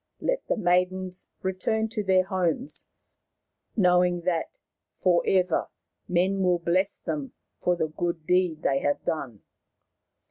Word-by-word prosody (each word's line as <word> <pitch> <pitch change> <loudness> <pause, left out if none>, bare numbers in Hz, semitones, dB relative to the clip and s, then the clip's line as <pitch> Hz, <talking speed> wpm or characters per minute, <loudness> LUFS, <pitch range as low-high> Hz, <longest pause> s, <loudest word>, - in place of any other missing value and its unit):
Let - - 0
the - - 0
maidens 180 -1 0 0.2
return 190 +4 0
to 215 -2 -3
their 190 -1 +4
homes, 190 - -2 0.9
knowing 180 -2 +4
that 170 -2 -1 0.5
for 175 -2 +3
ever 185 -1 +2 0.4
men 185 +2 +1
will 180 -1 +3
bless 185 +4 0
them 150 -5 -4 0.3
for 180 - +2
the 160 -2 -1
good 170 0 -3
deed 180 -2 +1
they 135 0 +2
have 145 +1 -1
done." 120 -10 -3
180 Hz, 130 wpm, -26 LUFS, 170-190 Hz, 0.9 s, their